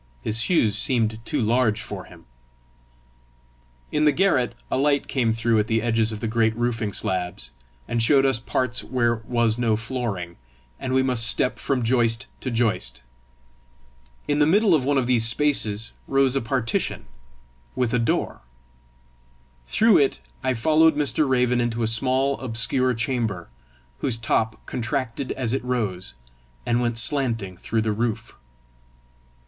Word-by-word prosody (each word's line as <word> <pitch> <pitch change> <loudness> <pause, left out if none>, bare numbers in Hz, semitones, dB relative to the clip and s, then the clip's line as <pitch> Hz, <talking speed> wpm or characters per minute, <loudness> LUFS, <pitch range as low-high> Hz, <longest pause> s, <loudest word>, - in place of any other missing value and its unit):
His 110 +1 +3
shoes 120 - +2
seemed 110 0 +1
too - - -2
large 115 -1 +1
for 110 - -7
him. - - -16 1.7
In 150 - +1
the 150 - +5
garret 145 -7 +1 0.2
a - - +1
light 140 0 +1
came 120 -4 0
through 115 0 +1
at 105 - 0
the 115 0 0
edges 115 -1 +1
of 105 -1 -6
the 115 - -2
great 110 0 +1
roofing 115 -3 -1
slabs, 90 -11 -2 0.4
and 120 -1 -1
showed 135 +4 +4
us 135 -3 +2
parts 125 0 -1
where 120 -2 0
was 115 0 0
no 115 -3 +2
flooring, 110 -7 -4 0.4
and 130 0 -2
we 130 - +3
must 125 -3 +2
step 125 - +1
from 130 -3 -1
joist 115 0 +1
to 130 - -4
joist: 115 - -1 1.2
in 145 0 +1
the 150 - +4
middle 200 +3 +4
of 150 -5 +3
one 140 +1 +1
of 130 - +1
these 120 -2 +2
spaces 115 -5 -1 0.2
rose 135 -1 +2
a 135 - +1
partition, 115 -1 -2 0.7
with 125 -2 -1
a 125 - +2
door: 115 - -1 1.3
through 215 - +4
it 140 -2 +1 0.2
I 130 0 0
followed 160 +6 +3
Mr. 150 0 0
Raven 125 -1 +2
into 120 -1 -1
a - - +1
small, 130 +4 +1
obscure 125 +1 +1
chamber, 115 -7 -2 0.5
whose 125 -4 -1
top 110 0 -1
contracted 125 +1 -3
as 125 -3 -1
it 135 - -2
rose, 100 - -3 0.5
and 120 0 +1
went 120 -1 -1
slanting 115 -7 +1
through 110 +5 -2
the 110 -1 0
roof. 115 +1 -3
120 Hz, 155 wpm, -23 LUFS, 110-130 Hz, 1.7 s, the